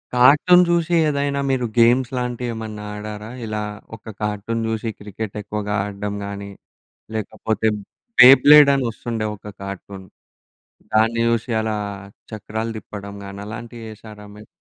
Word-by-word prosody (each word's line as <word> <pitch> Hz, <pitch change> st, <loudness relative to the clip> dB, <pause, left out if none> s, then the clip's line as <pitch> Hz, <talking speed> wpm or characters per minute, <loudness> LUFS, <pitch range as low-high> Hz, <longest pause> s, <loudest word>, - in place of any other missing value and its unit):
Cartoon 150 Hz, +8 st, +6 dB
చూసి 170 Hz, 0 st, +1 dB
ఏదైనా 140 Hz, -1 st, 0 dB
మీరు 130 Hz, -2 st, 0 dB
గేమ్స్ 120 Hz, +2 st, +4 dB
లాంటివి 125 Hz, 0 st, -3 dB
ఏమన్నా 110 Hz, -2 st, -7 dB
ఆడారా? 105 Hz, +1 st, -7 dB
ఇలా 105 Hz, -1 st, -3 dB, 0.3 s
ఒక 110 Hz, 0 st, -11 dB
కార్టూన్ 105 Hz, +2 st, -2 dB
చూసి 110 Hz, 0 st, -2 dB
క్రికెట్ 105 Hz, +1 st, -7 dB
ఎక్కువగా 105 Hz, 0 st, -4 dB
ఆడడం 100 Hz, 0 st, -5 dB
గాని 100 Hz, 0 st, -7 dB, 0.7 s
లేకపోతే 110 Hz, +1 st, -2 dB, 0.5 s
బె 125 Hz, -, +12 dB, 0.2 s
బ్లేడ్ 150 Hz, -1 st, +9 dB
అని 135 Hz, -2 st, 0 dB
వస్తుండే 115 Hz, -1 st, -4 dB
ఒక -, -, -29 dB, 0.2 s
కార్టూన్, 100 Hz, 0 st, -8 dB, 0.9 s
దాన్ని 115 Hz, +2 st, +3 dB
జూశి 115 Hz, +1 st, -1 dB
అలా 110 Hz, -1 st, -2 dB, 0.5 s
చక్రాలు 110 Hz, +1 st, -4 dB
తిప్పడం 100 Hz, -1 st, -8 dB
గాని 100 Hz, 0 st, -8 dB
అలాంటివి 115 Hz, +1 st, -8 dB
చేసారా 105 Hz, -1 st, -12 dB
మీరు? 105 Hz, 0 st, -13 dB
110 Hz, 130 wpm, -21 LUFS, 105-120 Hz, 0.9 s, బె